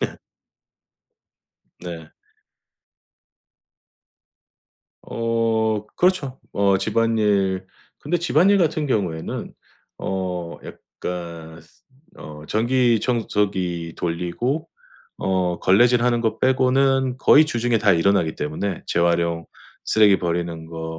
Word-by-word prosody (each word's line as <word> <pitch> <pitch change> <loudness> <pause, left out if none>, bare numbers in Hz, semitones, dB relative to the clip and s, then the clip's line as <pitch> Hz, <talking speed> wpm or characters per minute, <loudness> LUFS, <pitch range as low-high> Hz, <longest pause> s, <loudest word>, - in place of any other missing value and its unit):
네. - - -3 1.6
네. 80 -3 -8 2.9
어 115 -2 -1
그렇죠. 165 -8 +1
어 100 -1 +2
집안일 100 -3 +1 0.3
근데 175 - -1
집안일 180 +4 +3
같은 155 -3 +1
경우에는 90 -10 -3 0.5
어 90 -3 -4
약간 85 -2 -8
쓰 80 - -25 0.3
어 75 0 -10
전기 120 +1 +2
청소기 95 -8 -1
돌리고 90 - -2 0.5
어 90 -2 -1
걸레질하는 120 +4 +3
거 110 0 -1
빼고는 130 0 +2
거의 150 +3 +6
주중에 120 -5 0
다 105 -2 +3
일어나기 85 -2 +2
때문에 85 +6 -4
재활용 85 -1 +1 0.4
쓰레기 105 -3 +4
버리는 85 -1 -3
거 80 0 -7
100 Hz, 190 characters per minute, -22 LUFS, 85-120 Hz, 2.9 s, 거의